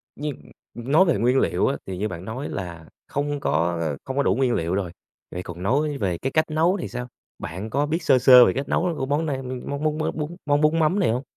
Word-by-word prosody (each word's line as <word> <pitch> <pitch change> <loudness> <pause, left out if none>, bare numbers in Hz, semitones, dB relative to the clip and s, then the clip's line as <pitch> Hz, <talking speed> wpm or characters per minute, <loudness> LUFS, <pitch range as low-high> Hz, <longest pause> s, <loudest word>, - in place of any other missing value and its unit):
Nhưng, 145 -1 -4 0.4
ưm, 120 +3 -6
nói 185 +5 +6
về 170 - +2
nguyên 125 +5 +3
liệu - - +1
á, 135 - 0
thì 95 -1 -5
như 105 +3 -1
bạn 90 -2 -7
nói 125 +7 -5
là 85 -4 -6 0.2
không 145 0 -2
có, 85 - 0
a, 75 -3 -1
không 130 +1 -5
có 140 - +3
đủ 95 - +2
nguyên 130 -2 +1
liệu 85 -1 -1
rồi, 95 -4 -2 0.4
vậy 90 - -5
còn 90 0 -8
nói 145 +6 +1
về 90 -8 -1
cái 135 +7 -3
cách 155 - +2
nấu 170 +5 +2
thì - - -4
sao? 125 0 -6 0.3
Bạn 95 +7 -6
có 140 +5 0
biết 160 +3 -2
sơ 135 -4 +4
sơ 125 -1 +9
về - - +2
cách 135 +1 -3
nấu, 180 - +1
ơ, 175 - 0
của 135 - -2
món 145 +4 0
này, 145 -4 -1
ưm, 130 -1 -6
món 140 +1 -3
món 155 0 0
mới 155 - -1
bún 155 +2 -5
món 145 0 +2
bún 155 +2 +3
mắm 165 +6 +2
này 175 - +2
hông? 125 +4 -2
135 Hz, 275 wpm, -23 LUFS, 100-150 Hz, 0.4 s, sơ